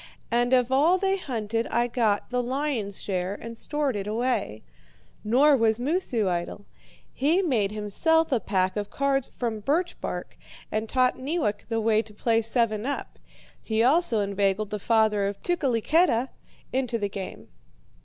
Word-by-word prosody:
And 240 Hz, +1 st, +2 dB
of 250 Hz, -1 st, +3 dB
all 305 Hz, +7 st, +4 dB
they 385 Hz, +1 st, +1 dB
hunted 230 Hz, -, -2 dB
I 240 Hz, -, +1 dB
got 230 Hz, -3 st, 0 dB
the 250 Hz, 0 st, +1 dB
lion's 250 Hz, -6 st, -2 dB
share 185 Hz, 0 st, -2 dB
and 230 Hz, +2 st, -8 dB
stored 290 Hz, +1 st, -2 dB
it 200 Hz, 0 st, -4 dB
away. 220 Hz, -, -1 dB, 0.6 s
Nor 275 Hz, +7 st, +5 dB
was 225 Hz, -3 st, +2 dB
Moosu 250 Hz, -, 0 dB
idle. 175 Hz, +3 st, -3 dB, 0.5 s
He 325 Hz, +8 st, +2 dB
made 225 Hz, -, +1 dB
himself 320 Hz, -, +1 dB
a 255 Hz, -, +3 dB
pack 190 Hz, -2 st, 0 dB
of 205 Hz, -1 st, -3 dB
cards 275 Hz, -1 st, 0 dB
from 230 Hz, -3 st, -4 dB
birch 325 Hz, -, -1 dB
bark, -, -, -5 dB, 0.3 s
and 220 Hz, +1 st, -2 dB
taught 255 Hz, -1 st, +2 dB
Neewak 260 Hz, -7 st, -2 dB
the 225 Hz, -1 st, -1 dB
way 220 Hz, 0 st, +3 dB
to 215 Hz, -2 st, -13 dB
play 225 Hz, +1 st, +2 dB
seven 225 Hz, -2 st, 0 dB
up. 285 Hz, -, -5 dB, 0.4 s
He 220 Hz, 0 st, 0 dB
also 260 Hz, -4 st, +3 dB
inveigled 200 Hz, +1 st, 0 dB
the 210 Hz, -, -3 dB
father 215 Hz, -2 st, +2 dB
of 200 Hz, 0 st, -5 dB
Tukeliketa 275 Hz, -3 st, +2 dB, 0.4 s
into 255 Hz, -2 st, 0 dB
the 205 Hz, -2 st, -1 dB
game. 195 Hz, -1 st, -7 dB
230 Hz, 155 wpm, -26 LUFS, 210-270 Hz, 0.6 s, Nor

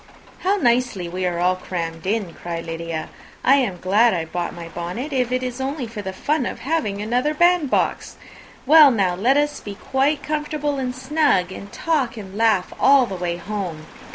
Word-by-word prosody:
"How 385 Hz, +2 st, +1 dB
nicely 240 Hz, -, +1 dB
we 180 Hz, +1 st, -2 dB
are 180 Hz, +1 st, +1 dB
crammed 165 Hz, -2 st, -5 dB
in!" 200 Hz, -4 st, -1 dB
cried 170 Hz, -1 st, -6 dB
Lydia. 165 Hz, -1 st, -5 dB, 0.3 s
"I 275 Hz, +2 st, +6 dB
am 225 Hz, -10 st, 0 dB
glad 210 Hz, +5 st, +3 dB
I 165 Hz, -2 st, -2 dB
brought 175 Hz, +1 st, -4 dB
my 170 Hz, -1 st, -8 dB
bonnet, 180 Hz, -, -5 dB
if 250 Hz, -2 st, 0 dB
it 255 Hz, 0 st, 0 dB
is 250 Hz, +1 st, -4 dB
only 270 Hz, 0 st, -2 dB
for 225 Hz, -2 st, -7 dB
the 190 Hz, -1 st, -5 dB
fun 285 Hz, +7 st, -1 dB
of -, -, -6 dB
having 265 Hz, -8 st, -1 dB
another 250 Hz, +7 st, 0 dB
band 345 Hz, -3 st, +3 dB
box! -, -, 0 dB, 0.5 s
Well, 305 Hz, +1 st, +8 dB
now 195 Hz, -7 st, +1 dB
let 240 Hz, +10 st, +2 dB
us 295 Hz, 0 st, 0 dB
be 205 Hz, -1 st, -8 dB
quite 270 Hz, +6 st, 0 dB
comfortable 300 Hz, -1 st, -2 dB
and 250 Hz, -1 st, -3 dB
snug, 260 Hz, -, +1 dB
and 200 Hz, +1 st, -9 dB
talk 285 Hz, -8 st, -1 dB
and 195 Hz, -2 st, -9 dB
laugh 215 Hz, -4 st, +2 dB
all 275 Hz, -2 st, +6 dB
the 195 Hz, -, -7 dB
way 175 Hz, -2 st, -3 dB
home. 175 Hz, -4 st, -5 dB
230 Hz, 185 wpm, -22 LUFS, 180-275 Hz, 0.5 s, Well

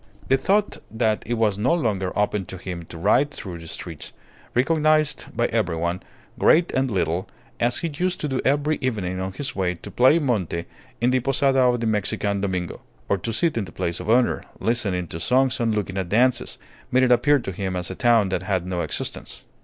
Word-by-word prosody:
The 135 Hz, -, +5 dB
thought 205 Hz, +8 st, +1 dB
that 110 Hz, -1 st, 0 dB
it 120 Hz, -, 0 dB
was 105 Hz, -3 st, +1 dB
no 130 Hz, +10 st, +3 dB
longer 100 Hz, -, -1 dB
open 105 Hz, -1 st, 0 dB
to 95 Hz, -, -8 dB
him 90 Hz, -2 st, -6 dB
to 85 Hz, -, -10 dB
ride 140 Hz, -, +3 dB
through 90 Hz, -11 st, -8 dB
the 85 Hz, -, -10 dB
streets, 80 Hz, -1 st, -7 dB, 0.4 s
recognized 155 Hz, +3 st, +2 dB
by -, -, +3 dB
everyone, 85 Hz, +2 st, -1 dB, 0.4 s
great 170 Hz, +2 st, +4 dB
and 130 Hz, 0 st, +1 dB
little, 90 Hz, -3 st, -1 dB, 0.3 s
as 120 Hz, +1 st, +2 dB
he -, -, +1 dB
used 180 Hz, +4 st, -1 dB
to 150 Hz, -, -1 dB
do 135 Hz, -2 st, -1 dB
every 145 Hz, +3 st, +1 dB
evening 100 Hz, -8 st, -2 dB
on 95 Hz, +1 st, -3 dB
his 130 Hz, +7 st, -4 dB
way 90 Hz, -2 st, 0 dB
to -, -, -11 dB
play 130 Hz, +6 st, +5 dB
monte 105 Hz, -, -1 dB, 0.3 s
in 120 Hz, +2 st, +2 dB
the 130 Hz, -, +3 dB
posada 135 Hz, +1 st, +2 dB
of 125 Hz, -2 st, +3 dB
the -, -, -1 dB
Mexican 100 Hz, -2 st, 0 dB
Domingo; 95 Hz, -3 st, -3 dB, 0.3 s
or 100 Hz, -, +2 dB
to 115 Hz, -, -3 dB
sit 130 Hz, +3 st, +1 dB
in 100 Hz, -, -2 dB
the 85 Hz, -, -11 dB
place 85 Hz, 0 st, -3 dB
of -, -, -6 dB
honour, 120 Hz, +2 st, +3 dB, 0.2 s
listening 100 Hz, -6 st, 0 dB
to 80 Hz, 0 st, -7 dB
songs 130 Hz, +7 st, +2 dB
and 115 Hz, -2 st, +1 dB
looking 95 Hz, -2 st, -2 dB
at 90 Hz, -2 st, -3 dB
dances, 120 Hz, +4 st, +2 dB, 0.3 s
made 130 Hz, +1 st, +4 dB
it 125 Hz, -, +3 dB
appear 125 Hz, +5 st, +5 dB
to 120 Hz, -7 st, -4 dB
him 95 Hz, 0 st, -3 dB
as 90 Hz, -2 st, -3 dB
a -, -, -6 dB
town 115 Hz, -5 st, +3 dB
that 95 Hz, -, -1 dB
had 95 Hz, -2 st, -1 dB
no 90 Hz, -1 st, -2 dB
existence. -, -, -4 dB
110 Hz, 210 wpm, -23 LUFS, 95-130 Hz, 0.4 s, The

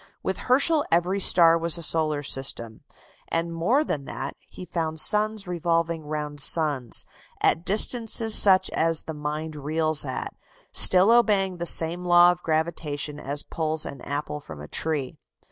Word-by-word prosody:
With -, -, -4 dB
Herschel 290 Hz, +4 st, +2 dB
every 175 Hz, +4 st, 0 dB
star 165 Hz, -3 st, +5 dB
was 170 Hz, +1 st, +3 dB
a 170 Hz, -, -2 dB
solar 155 Hz, -2 st, 0 dB
system. 125 Hz, -5 st, -5 dB, 0.5 s
And 165 Hz, 0 st, -3 dB
more 225 Hz, -, 0 dB
than 145 Hz, -, -5 dB
that: -, -, -7 dB
he 185 Hz, -, -11 dB
found 160 Hz, -2 st, -4 dB
suns 210 Hz, +4 st, +1 dB
revolving 165 Hz, -2 st, -3 dB
round 150 Hz, -1 st, -6 dB
suns, 145 Hz, -6 st, 0 dB, 0.3 s
at 165 Hz, -, +1 dB
distances 225 Hz, +2 st, +3 dB
such 190 Hz, -3 st, +5 dB
as 165 Hz, -1 st, 0 dB
the 160 Hz, -, -8 dB
mind 150 Hz, +1 st, -6 dB
reels 155 Hz, +1 st, 0 dB
at, 130 Hz, -3 st, -6 dB, 0.4 s
still 190 Hz, +4 st, +6 dB
obeying 205 Hz, -6 st, +1 dB
the 170 Hz, 0 st, -2 dB
same 170 Hz, +2 st, +3 dB
law 175 Hz, 0 st, +5 dB
of 175 Hz, 0 st, -7 dB
gravitation 155 Hz, -3 st, -3 dB
as 145 Hz, +1 st, -3 dB
pulls 155 Hz, -1 st, -3 dB
an 140 Hz, -3 st, -9 dB
apple 150 Hz, +1 st, -5 dB
from 80 Hz, -, -12 dB
a 75 Hz, -, -10 dB
tree. 150 Hz, -, -3 dB
165 Hz, 155 wpm, -23 LUFS, 150-180 Hz, 0.5 s, still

